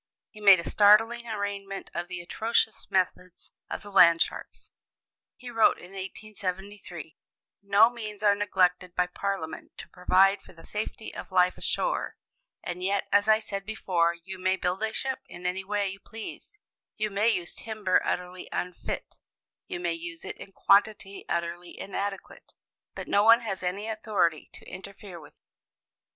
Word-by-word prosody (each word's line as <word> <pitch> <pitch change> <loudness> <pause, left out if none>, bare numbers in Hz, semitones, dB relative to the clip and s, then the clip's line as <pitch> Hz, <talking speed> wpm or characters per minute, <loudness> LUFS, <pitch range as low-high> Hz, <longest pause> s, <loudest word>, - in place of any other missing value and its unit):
He 215 - -13
made 195 -3 +8
a 170 - -6
startling 225 +3 +5
arraignment 200 -2 -4
of 175 0 -3
the 180 -1 -6
atrocious 220 +5 0
methods 180 -1 -1 0.2
of - - -5
the 205 - -10
land 170 -3 +7
sharks. - - -9 0.6
He 250 -1 -9
wrote, 225 -1 +4
in 180 - -13
1873, 195 -4 -6 0.5
"No 200 +2 +6
means 215 -3 -7
are 205 -1 +6
neglected 185 -3 +1
by 180 - +3
Parliament 180 -2 -4
to - - -9
provide 195 +2 +3
for - - -16
the 165 - -15
safety 215 +1 -5
of - - -8
life 180 -1 +4
ashore; - - -1 0.5
and 175 0 -5
yet, 195 +1 0
as 205 +1 +4
I 215 - +7
said 200 -2 -5
before, 175 -5 0
you 190 +1 -8
may 185 +1 +2
build 180 +1 -2
a 220 0 0
ship 265 +3 -2
in 175 0 -11
any 185 +2 -1
way 205 0 -1
you 195 +1 -8
please, 225 - -10 0.4
you 215 -1 -1
may 205 +3 +3
use 175 -6 -1
timber 215 -4 0
utterly 180 0 -3
unfit, 180 -1 -4 0.5
you - - -4
may 175 -1 -1
use 165 0 -7
it - - -6
in 195 - -11
quantity 200 0 +2
utterly 170 +1 -3
inadequate, 200 0 -5 0.4
but - - -6
no 205 - +4
one 230 +2 +7
has 200 -5 -4
any 190 +4 -3
authority 215 -7 0
to - - -12
interfere 195 -1 -9
with 150 - -15
you. - - -56
195 Hz, 165 wpm, -28 LUFS, 180-210 Hz, 0.6 s, made